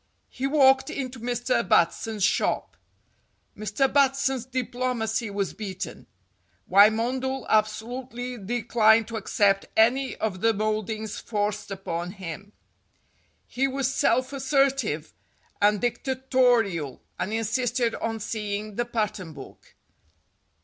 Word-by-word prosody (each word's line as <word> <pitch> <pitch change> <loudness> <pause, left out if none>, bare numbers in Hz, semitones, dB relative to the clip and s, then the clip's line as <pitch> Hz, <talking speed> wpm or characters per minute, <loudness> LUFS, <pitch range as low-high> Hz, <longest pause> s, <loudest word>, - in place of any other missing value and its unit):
He 265 - -3
walked 270 -2 +4
into 260 -2 -5
Mr. 245 +2 0
Batson's 205 +5 +2
shop. - - +1 0.8
Mr. 215 +5 0
Batson's 270 -2 +1
diplomacy 245 -3 -2
was 200 -1 -2
beaten. 195 -4 -6 0.6
Wymondel 240 +7 +3
absolutely 245 +3 -1
declined 225 +1 +3
to 230 - -5
accept 195 -1 +1
any 255 +5 +3
of 190 -4 -3
the 225 -1 +3
mouldings 215 0 -2
forced 210 -1 -2
upon 180 -2 -4
him. 195 +1 -8 0.9
He 265 +2 0
was 270 0 -1
self 255 +2 +1
assertive 270 - 0 0.5
and 205 0 +4
dicta 245 +3 -1 0.2
torial, 225 - +2 0.2
and 200 - -2
insisted 230 +2 0
on 225 0 -3
seeing 210 -1 -4
the 240 - 0
pattern 210 -7 -3
book. 140 -3 -13
225 Hz, 110 wpm, -26 LUFS, 205-255 Hz, 0.9 s, walked